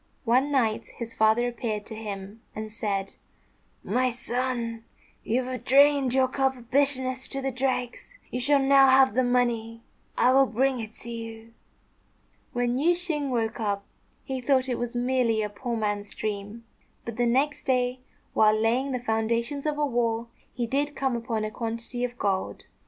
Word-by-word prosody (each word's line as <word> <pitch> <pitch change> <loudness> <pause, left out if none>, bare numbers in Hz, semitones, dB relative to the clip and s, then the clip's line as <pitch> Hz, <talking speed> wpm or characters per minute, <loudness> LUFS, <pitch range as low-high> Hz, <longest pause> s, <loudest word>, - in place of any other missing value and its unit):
One 255 +5 +3
night 230 -6 +1
his 230 -1 -6
father 220 +3 +3
appeared 220 -3 -3
to 225 - -8
him 205 0 -7
and 215 0 -5
said, 200 -3 -3 0.7
"My 255 0 +1
son, 240 -1 -3 0.4
you 250 +3 0
have 255 0 -5
drained 280 0 +5
your 260 0 +3
cup 265 0 0
of 240 0 -16
bitterness 260 -2 +1
to 275 - -4
the 270 0 -2
dregs. 255 - -3
You 250 - -2
shall 285 +3 +3
now 275 0 +6
have 260 -2 +6
the 255 +3 +2
money. 235 -2 0 0.3
I 250 - +5
will 270 +1 +5
bring 260 +2 +1
it 220 -1 -7
to 235 - -6
you." 225 0 -8 1.0
When 245 0 0
Yüeh 330 +6 +4
shêng 325 -5 0
woke 230 -3 -1
up, 200 -2 -1 0.4
he 265 -2 -4
thought 260 0 +2
it 250 - -2
was 240 0 -4
merely 240 -3 +1
a 210 - -2
poor 235 +3 -4
man's 205 -1 -2
dream; 210 +2 -5 0.4
but 230 -1 -6
the 240 -1 +2
next 275 +5 +1
day, 250 -1 +1 0.3
while 215 0 +4
laying 250 +5 +1
the 250 - -1
foundations 235 +5 0
of 300 -1 -1
a 295 - +2
wall, 235 -3 -1 0.2
he 240 -1 -2
did 285 +4 -1
come 265 -2 0
upon 230 -2 -2
a 215 - -3
quantity 230 +2 -4
of 245 0 -3
gold. 195 -4 -2
245 Hz, 175 wpm, -26 LUFS, 225-265 Hz, 1.0 s, now